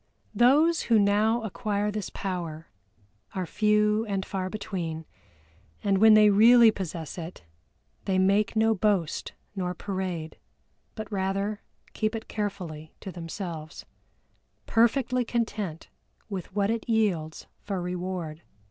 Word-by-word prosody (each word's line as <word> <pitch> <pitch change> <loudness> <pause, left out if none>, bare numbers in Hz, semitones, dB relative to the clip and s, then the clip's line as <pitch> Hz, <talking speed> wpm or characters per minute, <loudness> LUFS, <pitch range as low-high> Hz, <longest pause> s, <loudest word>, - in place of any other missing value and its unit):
Those 295 +9 +4
who 230 - +6
now 215 +3 +3
acquire 210 -1 -1
this 210 -1 -4
power 170 -4 -5 0.7
are 185 -1 -1
few 210 +2 +2
and 195 -2 -2
far 190 -2 -3
between, 175 -6 -4 0.8
and 195 -2 +2
when 220 +1 +8
they 210 -1 +7
really 230 +2 +7
possess 170 -5 -6
it 170 +2 -8 0.6
they 190 -1 +1
make 200 +3 +2
no 220 0 +4
boast 195 -6 0 0.2
nor 180 -2 -2
parade, 185 -5 -4 0.6
but 215 0 -7
rather 195 +2 -1 0.3
keep 215 0 -1
it 225 - -6
carefully 180 -7 -5
to 190 - -7
themselves, 165 -2 -7 0.8
perfectly 245 +2 +2
content 220 -8 -3 0.4
with 190 -3 -5
what 200 +1 +2
it 230 +1 -3
yields 185 -9 0 0.2
for 195 -2 -3
reward. 180 -3 -4
200 Hz, 120 wpm, -27 LUFS, 180-215 Hz, 0.8 s, when